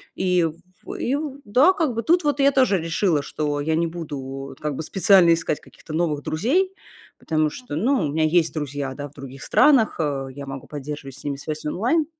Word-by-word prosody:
И 180 -2 +2
в 170 +3 -8
и 260 - -1
в 285 -2 -5
да, 260 - +5
как 315 - 0
бы 230 - 0
тут 345 0 +3
вот 290 -1 0
я 280 0 +5
тоже 255 -7 +3
решила, 165 -1 +1
что 145 0 -2
я 160 +2 0
не 165 +1 +1
буду 160 -4 -6
вот 135 0 -7
как 150 -2 -3
бы 160 - -4
специально 185 -1 +5
искать 165 -2 -1
каких-то 155 - -13
новых 155 -3 0
друзей. 330 - +1 0.5
Потому 155 -1 +1
что, 245 -4 -7
ну, 225 - +1
у - - -1
меня 160 0 +1
есть 165 +1 +2
друзья, 145 -3 -3
да, 145 0 -6
в 140 - -19
других 135 -1 -10
странах, 260 - +4
э, 140 -3 -1
я 140 - -7
могу 135 -1 -8
поддерживать 145 -2 -7
с - - -15
ними 140 -1 -3
связь 155 +1 -6
онлайн. 245 - +1
160 Hz, 210 wpm, -23 LUFS, 145-230 Hz, 0.5 s, да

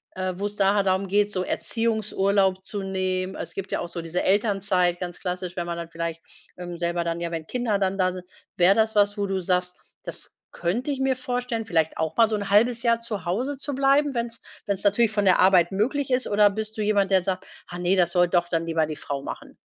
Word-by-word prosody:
äh, 185 0 -2
wo 200 +3 -2
es 205 0 -9
da 195 0 +3
halt 200 -2 +1
darum 190 +1 +1
geht, 205 +2 +2
so 185 -2 -1
Erziehungsurlaub 200 -4 0
zu 200 +1 -4
nehmen. 185 0 -2
Es - - -6
gibt 195 0 -6
ja - - 0
auch - - -4
so 170 0 -5
diese 165 +2 -2
Elternzeit 195 -3 +2
ganz 175 -1 -5
klassisch, 180 -1 -4
wenn 175 - -3
man 170 0 -4
dann 170 -1 -6
vielleicht, 165 0 -4 0.4
ähm, 175 -1 -6
selber 170 0 -1
dann 170 0 -2
ja, 170 -1 -3
wenn 165 -2 -5
Kinder 240 -5 -1
dann 195 0 0
da 185 -1 +2
sind. 180 0 -8 0.3
Wäre 185 +2 +5
das 220 0 +2
was, 205 0 +3
wo 200 -1 -1
du 195 -1 -1
sagst: 180 0 0 0.3
„Das - - -6 0.2
könnte 215 - -2
ich 275 - -3
mir 265 -1 +2
vorstellen, 245 -2 -3
vielleicht 160 -5 +1
auch 160 -1 -2
mal 230 -1 +5
so 220 - 0
'n 200 -1 -4
1/2 230 +3 +4
Jahr 230 -1 +2
zu 215 -5 -5
Hause 250 +11 -1
zu 280 +1 -3
bleiben, 275 +1 +3
wenn's 235 0 -3 0.2
wenn's 200 -2 -2
natürlich 210 +2 +3
von 205 -1 0
der 185 - +5
Arbeit 185 -2 +5
möglich 260 +8 0
ist.“ 255 0 +2
Oder 205 0 +5
bist 220 +2 -5
du - - -2
jemand, 205 -2 +2
der 190 - +5
sagt: 185 +1 -3 0.2
„Ah 175 - -7
ne, 180 +2 +1
das 175 -2 +2
soll 175 -1 +4
doch 175 0 +1
dann 165 -1 0
lieber 160 -2 0
die 155 - -5
Frau 140 -1 -5
machen“? - - -8
195 Hz, 240 wpm, -25 LUFS, 180-220 Hz, 0.4 s, Wäre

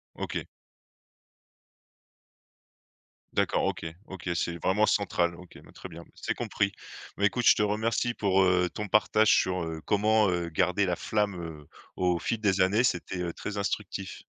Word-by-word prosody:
OK. - - -4 2.9
D'accord. - - +1
OK, - - -2 0.2
OK, 95 -2 -7
c'est 85 +1 -1
vraiment 105 +3 +3
central. 85 -5 +1
OK, 90 0 -14
bah, - - -17
très 95 - -9
bien. 85 +1 -11
C'est - - -3
compris. 100 0 -1 0.5
Bah - - +2
écoute, - - 0
je - - +8
te - - 0
remercie 110 +3 0
pour, 95 -3 +2
heu, 90 -1 +3
ton 105 0 -4
partage 105 +1 +3
sur, 90 -2 +1
heu, 80 -1 -5
comment, 105 0 +3
heu, 85 -1 -1
garder 90 +4 +1
la 90 -1 0
flamme 105 0 -1
heu, 80 -4 -8 0.3
au 90 -2 +1
fil 115 - -2
des 100 -3 +2
années. 100 +6 +3
C'était, 90 -2 -1
heu, 85 -1 -3
très 105 0 -6
instructif. 100 -2 -3
95 Hz, 160 wpm, -28 LUFS, 90-105 Hz, 2.9 s, je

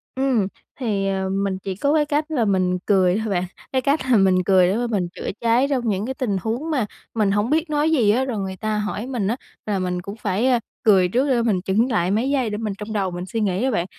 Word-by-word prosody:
Ừm, 260 -7 +1 0.3
thì, 205 -6 -1
ờ, 190 -1 -1
mình 195 0 -1
chỉ 190 -1 -3
có 280 +9 +1
cái 305 -1 +3
cách 300 +2 -1
là 245 -7 +1
mình 185 -2 +1
cười 190 -2 +3
thôi 220 0 -2
bạn. 180 -3 0 0.3
Cái 260 -1 +1
cách 280 +4 +2
là 235 - +6
mình 190 -2 +3
cười 185 -1 +4
để 190 - +1
mà 240 0 -1
mình 200 -6 -1
chữa - - -4
cháy 235 +3 +3
trong 250 -5 0
những 200 0 -1
cái 260 - -3
tình 245 -7 -1
huống 240 - -3
mà 265 -8 +1 0.3
mình 210 -3 +2
hổng 205 +3 +1
biết 315 +2 +1
nói 300 +1 +1
gì 235 -10 +4
á. 255 +5 +1
Rồi 240 -5 -3
người 190 -1 -4
ta 215 +3 -2
hỏi 210 +2 -3
mình 240 -7 -2
á, 225 - 0 0.3
là 205 -2 -1
mình 180 -1 -2
cũng 200 +3 -7
phải 210 +3 0 0.4
cười 190 -4 +5
trước 255 +9 +1
để 245 -3 +3
mình 210 -6 +1
chững 215 +7 +1
lại 175 -3 +1
mấy 225 +6 +1
giây 265 -5 +1
để 210 - -3
mình 215 -2 -3
trong 210 +1 -6
đầu 195 -3 0
mình 175 +1 -5
suy 210 +5 -3
nghĩ 195 +1 0
đó 265 - +1
bạn. 175 -7 0
215 Hz, 265 wpm, -22 LUFS, 190-255 Hz, 0.4 s, là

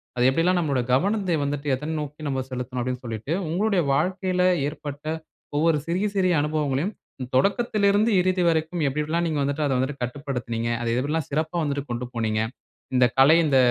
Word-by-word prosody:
அது 125 - +1
எப்படியெல்லாம் 170 +6 +2
நம்மோட 145 -6 0
கவனத்தை 190 +4 +2
வந்துட்டு 145 +1 -3
எதை 150 +4 -6
நோக்கி 150 +1 -8
நம்ம 135 -2 -1
செலுத்தனும், 125 0 -4
அப்டின்னு 125 +1 -3
சொல்லிட்டு. 115 +6 -3 0.2
உங்களுடைய 195 +2 +1
வாழ்க்கையில 185 +4 +1 0.2
ஏற்பட்ட 145 -1 -7 0.5
ஒவ்வொரு 160 +1 +3
சிறிய, 185 +5 0
சிறிய 185 -2 +3
அனுபவங்களையும். 150 +4 -1 0.4
தொடக்கத்திலிருந்து 205 - +3
இறுதி 185 0 +1
வரைக்கும் 165 +1 0
எப்டி, 140 +3 -2
எப்டில்லாம் 165 +3 0
நீங்க 155 -3 -1
வந்துட்டு 140 +2 -1
அதை 140 - +1
வந்து 130 +3 -1
கட்டுப்படுத்தினீங்க. 125 -3 -3
அதை 115 -1 -1
எப்டில்லாம் 150 +2 -1
சிறப்பா 155 +3 -1
வந்துட்டு 140 -2 -1
கொண்டு 120 +1 -3
போனீங்க. 110 -2 0 0.5
இந்த 125 0 +6
கலை 135 +4 +7
இந்த 140 -3 +3
150 Hz, 160 wpm, -24 LUFS, 130-175 Hz, 0.5 s, கலை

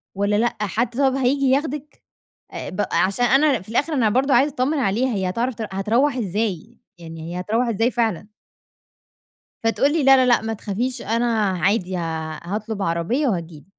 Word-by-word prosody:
والّا 200 +1 +1
لأ 240 +3 +1
حد 215 +4 0
طب 270 -2 +2
هييجي 270 +1 +1
ياخدِك 290 +1 -2 0.5
آآ - - -6
بق - - -3
عشان 195 +6 +2
أنا 270 - +3
في 190 - -19
الآخر 280 +8 0
أنا 235 -7 +2
برضه 265 +3 +2
عايزة 275 +4 +3
اتطمن 285 +3 0
عليها 245 +1 0
هي 190 -2 -1
هتعرف 235 +7 -1
تر 220 -1 -5
هتروُح 230 +9 +1
ازاي 215 0 -3 0.2
يعني 165 0 -8
هي - - -3
هتروُح 225 +6 0
ازاي 225 +2 +1
فعلًا؟ 225 -7 -1 1.4
فتقول 225 +5 +2
لي 320 - +1
لا 270 0 +7
لا 260 - +4
لأ 245 -1 +4
ما 225 0 -3
تخافيش 235 +4 -3
أنا 230 +2 0 0.3
عادي 190 0 +1
ها 160 -2 -4
هاطلب 210 +3 -4
عربية 185 - 0
وهتيجي 170 - -3
لي - - -22
230 Hz, 180 wpm, -22 LUFS, 195-260 Hz, 1.4 s, لا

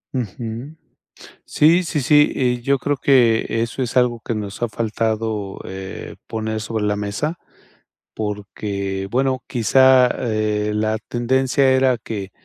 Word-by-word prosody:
Ujú. 120 +4 -5 0.7
Sí, 165 +4 +4
sí, 165 -4 -2
sí, 150 +3 +4
eh, 125 -2 +1
yo 140 +3 +2
creo 145 +2 -1
que 120 -5 +4 0.2
eso 115 +3 -3
es 125 -3 -3
algo 125 -2 +2
que, 115 - -4
nos 105 +1 -6
ha 120 - +1
faltado, 110 -2 -2
eh, 95 0 -8
poner 110 0 -3
sobre 110 0 -3
la 105 0 0
mesa, 105 +12 -3 0.7
porque, 100 -2 -4
bueno, 130 +1 0
quizá, 130 +1 +5
eh, 110 -3 -1
la 110 +1 0
tendencia 130 +3 +2
era 130 -1 +3
que 100 -4 -6
115 Hz, 135 wpm, -20 LUFS, 105-130 Hz, 0.7 s, quizá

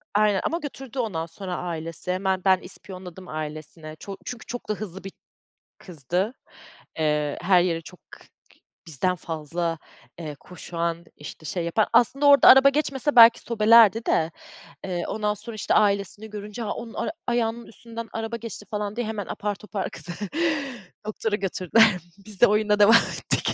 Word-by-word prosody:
Aynen 210 -2 +3
ama 330 - 0
götürdü 270 -3 -7
ondan 180 -9 -2
sonra 180 +2 -6
ailesi. 165 0 -4
Hemen 190 0 0
ben 190 -1 +5
ispiyonladım 185 -1 -10
ailesine. 155 0 -7
Ço 195 -1 -8
çünkü 245 -3 -7
çok 245 -2 -7
da - - +2
hızlı 195 -3 -7
bir 195 - -7 0.7
kızdı. 180 - -3 0.7
Eee, 150 -1 0
her 180 0 +4
yere 170 -2 0
çok 180 0 -13
k - - -12 0.3
k - - -26 0.3
bizden 175 +5 0
fazla, 165 +1 -3 0.4
eee, 155 -3 -6
koşan, 170 -1 -4
işte 150 +2 -10
şey 175 +3 -3
yapan. 205 +6 +1
Aslında 250 +5 +3
orada 280 -1 +7
araba 265 +1 +9
geçmese 275 -1 0
belki 230 0 +9
sobelerdi 225 0 +5
de, 160 +1 +1 0.5
eee, 175 -2 -3
ondan 210 -1 -1
sonra, 220 +2 -9
işte, 215 - -1
ailesini 200 +1 +1
görünce, 210 +2 -7
“A, 210 - -3
onun 230 -1 -8
ar - - -2 0.2
ayağının 235 -1 -1
üstünden 230 +1 -9
araba 225 +1 -3
geçti.” 225 -2 -8
falan 210 0 -3
diye 240 -2 -2
hemen 215 -3 -4
apar 205 0 -3
topar 205 -1 -5
kızı 175 - -7 0.9
doktora 215 0 -2
götürdüler. 195 +2 +3 0.4
Biz 210 -3 -10
de 240 - +9
oyuna 210 0 +2
devam 210 +2 +8
ettik. 230 - +1
200 Hz, 160 wpm, -24 LUFS, 175-225 Hz, 0.9 s, araba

